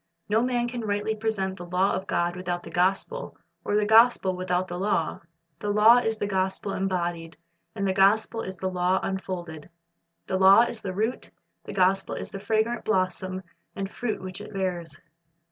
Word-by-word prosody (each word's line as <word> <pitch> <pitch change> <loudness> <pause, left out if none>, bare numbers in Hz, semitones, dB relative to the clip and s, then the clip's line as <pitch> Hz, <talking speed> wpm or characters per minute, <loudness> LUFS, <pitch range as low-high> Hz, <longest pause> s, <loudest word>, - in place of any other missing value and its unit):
No 220 +2 +2
man 245 -1 0
can 240 0 -4
rightly 205 +1 -1
present 205 -3 -2
the 175 - -8
law 180 +3 +2
of 190 - -3
God 175 0 0
without 180 -1 -3
the - - -10
gospel, 195 - -1 0.3
or 205 - -1
the 210 0 +3
gospel 220 -3 +5
without 185 0 -1
the 175 0 -5
law. 190 -4 0 0.4
The 205 - -3
law 210 +3 +7
is 225 -2 0
the 205 - -2
gospel 190 0 -1
embodied, 175 -3 -2 0.4
and 200 -2 -1
the 190 - +1
gospel 210 +4 +3
is 190 -2 -6
the 185 +1 -3
law 180 +1 +1
unfolded. 175 -5 -5 0.6
The 190 - -1
law 190 +3 +8
is 235 -1 -1
the 185 -2 -5
root, 220 +5 -2 0.4
the - - -7
gospel 190 0 +2
is - - -6
the 195 - -6
fragrant 220 +3 0
blossom 185 -1 -1 0.3
and 195 0 -4
fruit 240 -3 -3
which 185 +1 -6
it 210 - -9
bears. 175 -6 -3
190 Hz, 180 wpm, -26 LUFS, 185-215 Hz, 0.6 s, law